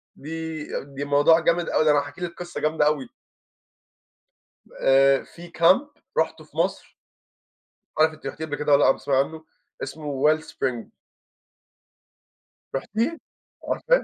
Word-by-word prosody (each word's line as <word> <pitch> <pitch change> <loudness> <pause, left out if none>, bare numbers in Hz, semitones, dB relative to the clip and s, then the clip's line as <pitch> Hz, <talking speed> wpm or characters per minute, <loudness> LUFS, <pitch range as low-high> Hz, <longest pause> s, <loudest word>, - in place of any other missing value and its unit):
دي 160 +1 -6 0.2
دي 140 0 -6
موضوع 145 +3 +5
جامد 170 +1 +1
أوي، 155 - +2
ده 155 - +6
أنا 145 - +4
هاحكي 145 +4 -7
لِك 175 -1 -3
قصّة 175 0 -6
جامدة 155 0 +2
أوي. 150 -3 0 1.7
آآ 135 0 +5
في 175 +1 -13
كامب 185 - +3 0.3
رُحته - - 0
في - - -19
مصر - - -1 1.0
مش - - -8
عارف 160 0 +4
أنتِ 155 - -16
رحتيه 160 - -5
قبل 145 -2 -4
كدة 150 +1 -1
والّا 140 0 +6
لأ، - - +6
بتسمعي 135 -2 -1
عنّه 155 +3 -2 0.4
اسمه 145 -3 -5
Well 155 +1 +4
Spring. 130 -7 -3 1.9
رُحتيه؟ 225 - -2 0.5
عارفاه؟ - - +2
155 Hz, 140 wpm, -24 LUFS, 145-165 Hz, 1.9 s, ده